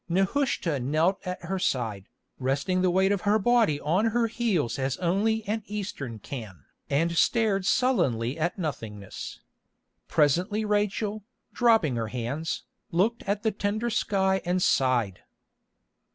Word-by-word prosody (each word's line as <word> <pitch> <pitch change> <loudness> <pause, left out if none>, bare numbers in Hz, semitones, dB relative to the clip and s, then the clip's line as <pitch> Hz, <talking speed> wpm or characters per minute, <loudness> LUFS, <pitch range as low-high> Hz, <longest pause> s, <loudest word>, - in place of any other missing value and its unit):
Nehushta 190 - +1
knelt 155 +9 +1
at 180 0 -4
her 190 +2 -2
side, 110 - -1 0.3
resting 140 +8 0
the 185 - +3
weight 190 +2 +3
of 200 -3 0
her 210 +1 +3
body 220 -8 +3
on 175 +10 +1
her 230 +1 +2
heels 200 - 0
as 135 0 -1
only 210 +5 +1
an 220 +2 -1
Eastern 200 - -5
can, 105 - -8 0.2
and 165 +4 +1
stared 200 -1 +2
sullenly 130 - +2
at 170 +5 -1
nothingness. 110 - -6 0.7
Presently 180 +9 +2
Rachel, 210 0 0 0.3
dropping 225 - +3
her 115 -1 -2
hands, 125 +8 -3 0.3
looked 210 +8 +1
at 205 +2 -1
the 220 - +2
tender 215 +4 -1
sky 190 -2 +1
and 180 +1 0
sighed. 125 - +2
185 Hz, 135 wpm, -27 LUFS, 135-210 Hz, 0.7 s, the